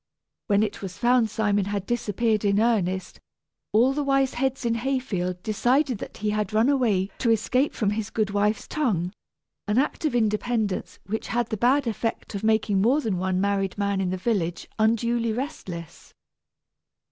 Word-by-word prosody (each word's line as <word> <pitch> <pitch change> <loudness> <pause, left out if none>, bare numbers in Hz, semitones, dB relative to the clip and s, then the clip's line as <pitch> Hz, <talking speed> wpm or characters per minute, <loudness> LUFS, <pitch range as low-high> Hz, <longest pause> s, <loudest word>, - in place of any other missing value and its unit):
When 205 -1 +3
it 210 -1 -3
was 190 -1 -6
found 240 0 +3
Simon 205 -3 +1
had 200 -1 -3
disappeared 225 -2 0
in 200 0 +3
earnest, 190 -5 0 0.5
all 245 +5 +4
the 295 +1 -1
wise 275 -1 +2
heads 265 0 -1
in 230 - +2
Hayfield 225 -8 -2
decided 250 +3 +1
that - - -8
he 210 - +2
had 210 -1 -2
run 220 +5 +4
away 215 -9 +1
to 235 - +1
escape 250 +5 +1
from 205 -3 +1
his 215 0 -3
good 215 -3 -1
wife's 210 +1 0
tongue, 195 - -1 0.5
an 210 +2 +1
act 280 +4 0
of 295 - 0
independence 220 -2 0
which 220 +3 -3
had 240 -1 -1
the 220 - -1
bad 255 +6 +3
effect 225 0 -3
of 200 +1 -4
making 220 -3 +2
more 250 +8 +4
than 215 -10 -1
one 185 0 0
married 195 -1 0
man 200 -1 0
in 185 - 0
the 185 - -2
village 180 -4 -1
unduly 230 +1 +2
restless. 195 - -7
220 Hz, 170 wpm, -25 LUFS, 200-240 Hz, 0.5 s, all